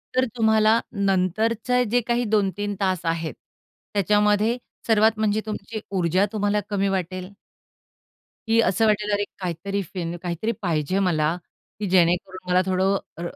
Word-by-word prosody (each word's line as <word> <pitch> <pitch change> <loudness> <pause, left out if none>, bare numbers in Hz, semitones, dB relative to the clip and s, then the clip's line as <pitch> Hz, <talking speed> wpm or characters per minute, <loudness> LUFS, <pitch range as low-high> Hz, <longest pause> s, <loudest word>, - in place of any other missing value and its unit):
तर 255 0 +3
तुम्हाला 220 0 +4
नंतरचे 215 +5 +1
जे 245 +1 +3
काही 240 0 +1
2-3 205 -1 0
तास 185 -3 0
आहेत, 165 -3 -1 0.6
त्याच्यामध्ये 210 +3 +2 0.3
सर्वात 220 -1 +5
म्हणजे 215 0 +1
तुमची 215 +1 -5
ऊर्जा 185 0 +2
तुम्हाला 205 0 +1
कमी 200 -1 0
वाटेल 185 -1 -3 1.2
की 225 +1 +4
असं 220 +4 +2
वाटेल 210 -1 +1
अरे 205 0 +1
काहीतरी 190 +2 -3
फिन 175 -1 -5
काहीतरी 180 +5 -2
पाहिजे 170 0 0
मला, 155 -1 +1 0.4
की 210 - -1
जेणेकरून 180 +1 +1
मला 180 0 +4
थोडं 190 +1 +2 0.2
अ, - - -5
200 Hz, 135 wpm, -24 LUFS, 180-215 Hz, 1.2 s, सर्वात